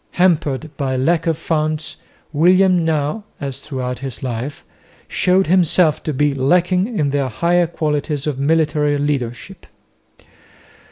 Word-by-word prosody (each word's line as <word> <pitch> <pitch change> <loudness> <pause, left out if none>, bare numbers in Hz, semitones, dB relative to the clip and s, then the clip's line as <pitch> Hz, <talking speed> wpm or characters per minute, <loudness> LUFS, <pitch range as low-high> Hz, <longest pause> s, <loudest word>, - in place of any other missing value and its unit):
Hampered 155 -5 +1
by 130 -3 -1
lack 165 +5 +1
of 165 -2 +1
funds 155 -2 -2 0.4
William 180 +3 +4
now, 155 +5 -1 0.2
as 135 -2 -5
throughout 125 -3 -4
his 135 -2 -6
life, 130 +3 -5 0.4
showed 185 +1 +2
himself 175 -2 +3
to 155 - -3
be 145 +1 +1
lacking 180 - +1
in 145 -4 +1
the 140 -1 0
higher 170 +9 +1
qualities 150 -3 -2
of 145 -3 -2
military 150 0 +1
leadership. 140 +4 -3
150 Hz, 125 wpm, -19 LUFS, 140-170 Hz, 0.4 s, William